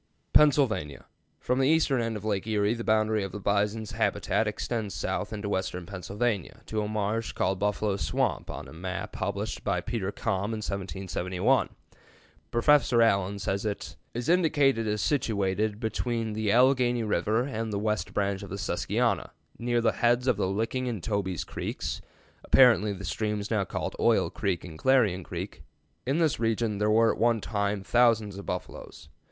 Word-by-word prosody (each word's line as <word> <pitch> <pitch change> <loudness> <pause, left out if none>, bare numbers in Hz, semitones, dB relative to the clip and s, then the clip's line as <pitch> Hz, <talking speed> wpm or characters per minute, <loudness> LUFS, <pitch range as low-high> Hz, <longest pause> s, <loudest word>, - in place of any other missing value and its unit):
PENNSYLVANIA. 130 - +3 0.4
From 125 +1 0
the 135 - +3
eastern 150 -5 +3
end 115 -1 -2
of 105 - -9
Lake 105 -1 -1
Erie 105 0 +2
the 115 -1 -5
boundary 110 -1 +2
of 95 - -5
the 105 - -6
bison's 105 +2 0
habitat - - 0
extends 110 -4 -3
south - - -2
into 105 -1 -4
western 95 -2 -2
Pennsylvania, 100 +2 -3
to 110 -1 -2
a 105 - -2
marsh 110 +2 -2
called 95 +1 0
Buffalo 105 0 0
Swamp - - -1
on - - -6
a - - -12
map 90 +2 -5
published 100 +1 -3
by 100 -3 0
Peter 100 +1 -3
Kalm 100 +4 -2
in - - -5
1771. 95 -2 -1 0.8
Professor 125 -1 +4
Allen 100 -2 +2
says 100 0 -2
it 105 -2 -4 0.2
"is 120 +1 -3
indicated 145 -9 +3
as 105 -1 0
situated 105 -5 0
between 115 -1 -2
the 105 -1 0
Alleghany 125 -1 +4
River 110 +3 +1
and 115 -4 -3
the 100 - -1
West 105 +1 -1
Branch 100 -1 -1
of 100 - -8
the 100 - -5
Susquehanna, 100 - 0 0.3
near 120 0 +1
the 115 - +3
heads 120 +1 +3
of 125 -3 +3
the 100 - 0
Licking 115 +6 -1
and 110 -8 -4
Toby's 95 -5 -1
Creeks - - -4 0.4
(apparently 115 -6 +5
the 100 0 -6
streams 105 +2 -2
now 105 -3 +1
called - - -4
Oil - - +3
Creek 95 -3 -2
and 80 -3 -10
Clarion 115 -9 +3
Creek)." - - -6 0.5
In 135 +4 +1
this 160 -7 +2
region 115 -2 0
there 105 0 +2
were 115 +1 +5
at - - -9
one 115 -1 +3
time 100 -1 -2
thousands 110 -3 +2
of 100 - -10
buffaloes. 90 -4 -6
105 Hz, 170 wpm, -28 LUFS, 100-115 Hz, 0.8 s, apparently